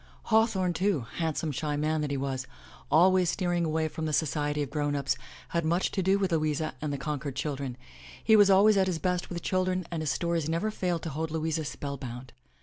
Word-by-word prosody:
Hawthorne, 195 -5 +3
too, 185 -3 +1 0.2
handsome 160 -1 -1
shy 145 +2 -2
man 155 +1 0
that 150 - -2
he 140 - -1
was, 130 -1 -3 0.4
always 185 +1 +5
steering 175 -2 0
away 160 0 0
from 160 0 -4
the 155 - -2
society 150 -1 0
of 140 - -7
grown 145 -1 0
ups, 140 -1 0 0.3
had 170 -1 0
much 170 +4 +1
to 195 - -1
do 190 +2 +3
with 195 -2 0
Louisa 155 -1 0
and 150 -1 -2
the 140 - -2
Concord 140 -1 -4
children. 135 -2 -3 0.5
He 220 - +6
was 205 -2 +7
always 200 +2 +6
at 190 -1 +3
his 180 -3 0
best 180 +2 -1
with 175 -1 -5
children 185 -1 0
and 165 -2 -2
his 155 - -1
stories 165 +2 0
never 170 +7 0
failed 180 -5 -2
to 165 - -3
hold 160 +3 -3
Louisa 160 0 -1
spellbound. 130 -3 -6
160 Hz, 210 wpm, -29 LUFS, 145-180 Hz, 0.5 s, was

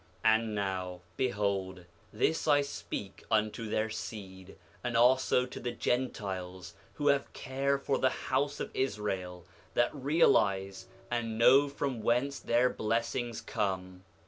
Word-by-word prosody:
5:10 110 - +7
And 110 -1 -2
now 95 -3 -3
behold, 100 -6 -1 0.3
this 125 +9 0
I 145 0 +5
speak 105 -7 -6
unto 110 0 0
their 110 +1 0
seed, 95 -4 -7 0.3
and 120 -2 0
also 125 +1 +4
to 125 - -8
the 120 - -3
Gentiles 95 -8 -3 0.2
who 145 -1 +1
have 140 -1 +2
care 135 +1 -1
for 140 0 -1
the 130 - +4
house 140 +3 -1
of - - -4
Israel, 95 -8 -2 0.3
that 120 - +2
realize 105 - +2 0.2
and 115 -2 -1
know 130 +5 +6
from 140 -4 -3
whence 125 +5 +1
their 120 +2 +3
blessings 115 +1 -1
come. 95 -1 -3
115 Hz, 135 wpm, -31 LUFS, 95-130 Hz, 0.3 s, 5:10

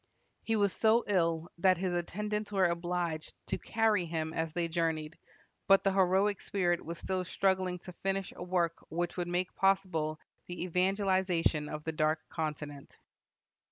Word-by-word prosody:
He 225 - 0
was 200 -3 +2
so 225 +2 +4
ill 170 -4 +1
that 185 0 +4
his 180 0 -1
attendants 210 +4 -2
were 195 -2 +3
obliged 170 -2 -2
to - - -1
carry 220 -5 +2
him 160 -1 -3
as 165 -1 -1
they 170 0 -1
journeyed, 160 -2 -1 0.5
but 195 0 +6
the 195 - +3
heroic 190 +2 +3
spirit 175 -3 0
was 170 +1 -6
still 185 +1 -2
struggling 185 0 +1
to 180 - -8
finish 195 0 -1
a - - -10
work 175 -2 0
which 175 +1 -2
would 175 -1 -2
make 180 +1 -1
possible 180 -6 +1 0.3
the 175 -1 -4
evangelization 185 -4 +1
of 150 0 -5
the 160 - -2
Dark 155 0 +1
Continent. 150 -2 -5
180 Hz, 155 wpm, -32 LUFS, 165-195 Hz, 0.5 s, but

